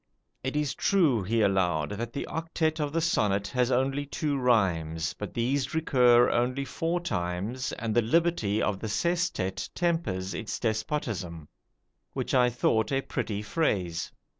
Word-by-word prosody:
It 130 +2 -3
is 150 -4 0
true, 160 - +2
he 110 +4 0
allowed, 90 -5 +1
that 115 +3 -4
the 140 - -4
octet 160 0 -1
of 145 -1 -1
the 165 +2 0
sonnet 100 -11 +1
has 125 -1 +1
only 135 +3 0
two 145 0 -1
rhymes, 90 - +1
but 105 - -6
these 130 +4 0
recur 125 -6 +5
only 125 +3 0
four 165 +6 -1
times, 105 - -3
and 115 -2 -3
the 120 - +4
liberty 120 -5 +1
of 100 -2 0
the 110 - -4
sestet 105 - -1
tempers 165 - -1
its 110 -1 -4
despotism, 110 - -2 0.7
which - - -3
I 125 -1 +5
thought 110 -2 +1
a 135 0 +1
pretty 105 -5 -3
phrase. 100 - -1
120 Hz, 150 wpm, -28 LUFS, 100-145 Hz, 0.7 s, recur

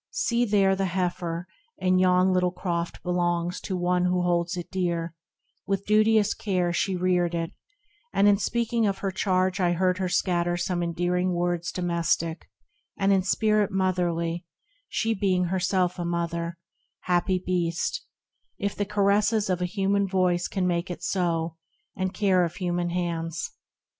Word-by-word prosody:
See 245 - +1
there 200 -3 +3
The 195 0 0
heifer 175 -2 -2 0.3
in 185 0 +2
yon 185 0 +4
little 180 0 +2
croft 175 -2 -3
belongs 175 -1 0
To 190 - -3
one 180 0 +1
who 180 0 +1
holds 175 0 0
it 175 - -6
dear; 170 -3 -1 0.5
with 195 0 -1
duteous 215 0 +4
care 180 -4 -1
She 190 +2 0
reared 180 -1 +1
it, 165 -1 -2 0.6
and 200 - +3
in 200 -1 +5
speaking 235 -1 0
of 195 -1 -1
her 195 - 0
charge 185 -1 +1
I 175 -2 +2
heard 185 +2 +1
her 185 -1 -1
scatter 175 -1 +1
some 175 0 -1
endearing 175 +2 0
words 175 0 -1
Domestic, 170 -2 -1 0.5
an^l 195 0 +3
in 195 -1 +4
spirit 210 +2 +2
motherly, 175 -3 0 0.4
She 225 -1 0
being 190 -3 +1
herself 180 0 0
a - - -1
mother; 170 0 -2 0.4
happy 180 +1 +1
Beast, 175 -2 -1 0.5
If 200 0 -2
the 205 - -1
caresses 205 +1 +2
of 180 0 -1
a - - +1
human 195 +1 +1
voice 180 -2 +1
Can 190 -2 -1
make 175 0 0
it 180 - -6
so, 165 -3 -1 0.4
and 185 0 -1
care 190 -2 +2
of 170 - -2
human 175 -2 -1
hands. 170 -1 -3
180 Hz, 155 wpm, -26 LUFS, 175-195 Hz, 0.6 s, in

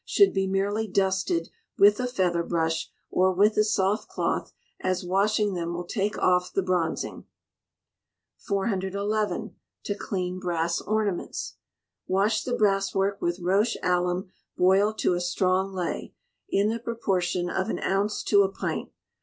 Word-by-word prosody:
should 400 - +4
be 195 -1 0
merely 200 +3 0
dusted 190 -3 0 0.3
with 205 +2 +6
a 250 - 0
feather 185 -8 +1
brush, 165 -1 -1 0.2
or 185 +1 +3
with 205 +4 +3
a 215 - +4
soft 210 0 +1
cloth, - - -2 0.3
as 185 -1 -1
washing 205 +2 +2
them 170 -1 -3
will 175 - -3
take 205 +2 -2
off 180 0 +2
the 195 - 0
bronzing. 180 -3 -1 1.2
411. 200 +1 -1 0.3
To 205 - -2
clean 185 -3 -3
Brass 170 -2 -1
Ornaments. 210 -4 -2 0.5
Wash 205 +3 +2
the 245 -1 -2
brasswork 195 -1 +1
with 175 +1 -1
roche 200 +6 +2
alum 180 +1 0 0.3
boiled 195 +4 +3
to 185 - +2
a 175 - -1
strong 185 +2 +1
ley, 180 -3 -4 0.3
in 200 +2 +2
the 230 +1 -2
proportion 185 -6 -1
of 190 +1 -1
an - - -1
ounce 200 +2 0
to 200 -1 +5
a 195 - +2
pint. 195 - -4
190 Hz, 145 wpm, -26 LUFS, 180-205 Hz, 1.2 s, with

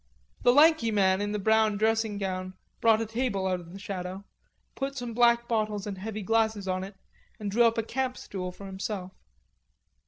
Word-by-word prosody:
The 245 - +5
lanky 295 -3 +5
man 195 -2 +3
in 205 0 -1
the 210 - -1
brown 220 0 +3
dressing 220 0 +1
gown 185 -1 -4 0.2
brought 225 -1 +4
a - - -1
table 225 -3 -1
out 185 -1 0
of 170 -1 -12
the 190 - -9
shadow, 195 -2 -5 0.5
put 275 0 -4
some 245 -2 -4
black 235 0 +4
bottles 215 -3 -1
and 200 -2 -5
heavy 215 +1 -5
glasses 220 -1 +1
on 185 0 -1
it, 195 +1 -9 0.4
and 205 -2 -3
drew 235 +3 +4
up 230 0 +3
a 225 - +1
camp 255 +2 -2
stool 180 -2 -5
for 200 +2 -11
himself. 190 -1 -5
210 Hz, 190 wpm, -28 LUFS, 190-230 Hz, 0.5 s, The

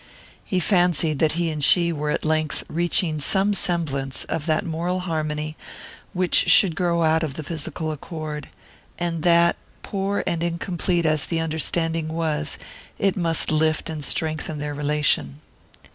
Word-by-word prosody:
He 185 - -1
fancied 175 -5 +2
that 155 -1 +3
he 170 0 0
and 150 -2 -3
she 170 +2 +5
were 150 -1 -3
at - - -1
length 155 -1 0
reaching 170 -1 +1
some 195 +8 +3
semblance 145 -8 -1
of 155 -1 -4
that 155 -1 +1
moral 175 +3 -2
harmony 155 -3 -3 0.6
which 180 -1 +2
should 180 -5 +6
grow 170 -1 +1
out 160 0 +3
of 150 -4 -3
the 155 - -5
physical 160 +1 -4
accord, 155 0 -6 0.5
and 170 -2 -2
that, 170 0 +4 0.3
poor 200 0 -2
and 170 -2 -1
incomplete 170 0 -1
as 155 -1 +2
the 165 - -1
understanding 165 0 0
was, 155 -2 -1 0.4
it 195 -2 +1
must 165 -4 0
lift 155 +1 +1
and 155 -2 -5
strengthen 155 -2 -1
their 145 0 -4
relation. 145 - 0
160 Hz, 150 wpm, -23 LUFS, 155-175 Hz, 0.6 s, should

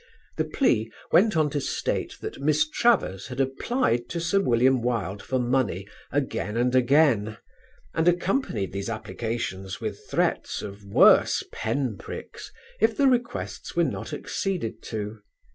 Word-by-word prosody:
The - - +1
plea 110 - +1 0.2
went 210 -1 +4
on 150 -2 +2
to 145 - -1
state - - -2
that - - -6
Miss 155 +2 +3
Travers 155 - +1
had 130 +1 -7
applied 135 - 0
to 170 - -3
Sir 170 +4 +2
William 125 -4 +3
Wilde 105 -5 -2
for 130 - -2
money 120 -6 0 0.2
again 125 -5 -1
and 125 +1 +2
again, 125 -5 +3 0.6
and 160 +1 +1
accompanied 175 - +1
these 100 +3 -3
applications 110 -3 -4
with - - -6
threats - - 0
of 100 0 -8
worse 100 - +5
pen 115 -1 -2
pricks - - -8 0.3
if 225 +1 +2
the 280 - +4
requests 245 -3 -1
were - - +4
not - - -3
acceded 165 - -3
to. 105 0 -5
125 Hz, 145 wpm, -26 LUFS, 110-160 Hz, 0.6 s, worse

